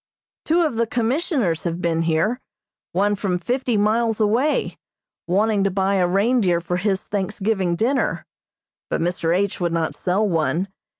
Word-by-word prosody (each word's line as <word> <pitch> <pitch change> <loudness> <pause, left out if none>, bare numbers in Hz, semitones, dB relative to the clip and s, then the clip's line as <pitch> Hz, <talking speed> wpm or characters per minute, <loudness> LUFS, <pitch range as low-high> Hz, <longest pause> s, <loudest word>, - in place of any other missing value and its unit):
Two 335 +2 +3
of 305 -9 0
the 230 0 +1
Commissioners 240 - 0
have 170 0 -2
been 165 -2 0
here, 165 +9 +1 0.5
one 205 +3 +1
from 195 -3 -1
fifty 245 +5 -1
miles 220 +2 +1
away, 230 +8 +1 0.5
wanting 205 +3 +2
to 195 - +2
buy 195 +1 0
a 180 -1 +2
reindeer 195 -1 +2
for 175 +1 -2
his 190 0 0
Thanksgiving 195 -2 -1
dinner, 255 +9 0 0.6
but - - -1
Mr. 170 0 0
H. 200 0 -1
would 175 -2 0
not 165 -1 -1
sell 195 +4 0
one. 170 +2 0
195 Hz, 155 wpm, -22 LUFS, 175-225 Hz, 0.6 s, Two